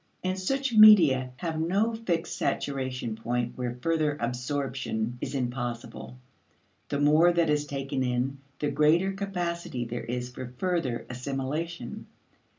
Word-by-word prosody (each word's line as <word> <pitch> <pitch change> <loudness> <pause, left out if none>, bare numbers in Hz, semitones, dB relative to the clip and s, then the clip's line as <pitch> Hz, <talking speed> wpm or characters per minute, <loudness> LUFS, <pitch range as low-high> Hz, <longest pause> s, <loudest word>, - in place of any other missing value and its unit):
And 185 +1 -1
such 270 +6 -1
media 170 - +8
have 160 +1 -3
no 195 +8 +1
fixed 185 -8 -2
saturation 130 -4 -2
point 120 +2 -2
where 125 -1 -4
further 155 -3 +1
absorption 125 -1 -2
is - - -4
impossible. 120 -1 -4 0.7
The 145 - -1
more 155 +4 +5
that 170 -3 +2
is 150 0 0
taken 135 -1 -3
in, 130 +2 -1 0.2
the 145 -1 -1
greater 155 +6 +3
capacity 175 -9 -3
there 120 +1 -5
is 125 +1 -4
for 125 0 -8
further 145 -9 -1
assimilation. 135 +3 -4
140 Hz, 130 wpm, -28 LUFS, 125-170 Hz, 0.7 s, media